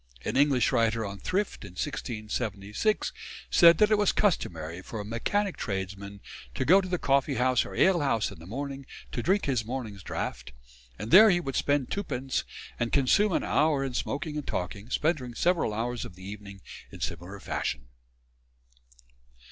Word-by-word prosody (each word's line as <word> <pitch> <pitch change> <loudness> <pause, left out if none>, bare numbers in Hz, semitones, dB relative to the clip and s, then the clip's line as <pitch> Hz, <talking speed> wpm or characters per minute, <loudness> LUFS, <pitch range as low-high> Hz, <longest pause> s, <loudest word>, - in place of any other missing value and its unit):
An - - -2
English 140 -3 +3
writer 115 -2 +1
on 100 0 -6
thrift 200 +2 -2
in 100 -3 -10
1676 110 - -2 0.4
said 170 -1 +7
that 210 0 +4
it 215 - +4
was 205 - +4
customary 85 - -1
for 110 +3 -7
a 105 - -5
"mechanic 190 - -1
tradesman" 100 0 -5 0.3
to - - -1
go 185 +8 +6
to 185 - -6
the 180 -1 0
coffee 140 -2 +1
house 130 -1 +2
or - - -8
ale 190 -2 +4
house 115 -7 +1
in - - -11
the 85 - -12
morning 135 +4 -5 0.2
to 120 - -2
drink 195 - +2
his 130 -6 0
morning's 110 -4 -5
draught, 65 -6 -5 0.4
and 105 +4 -6
there 215 +3 +10
he 175 -3 +3
would 135 -6 -4
spend 145 -3 +1
twopence 135 -10 -2 0.3
and 120 0 -1
consume 170 +10 +3
an - - +1
hour 150 -2 +2
in 135 -2 -3
smoking 150 +4 -3
and 150 - -5
talking, 100 +5 -4
spending 130 -5 0
several 175 -4 +2
hours 120 +3 -2
of 90 - -9
the 95 +1 -12
evening 100 -1 -9 0.3
in - - -10
similar 90 +4 -5
fashion. 65 - -3
125 Hz, 170 wpm, -28 LUFS, 100-155 Hz, 0.4 s, there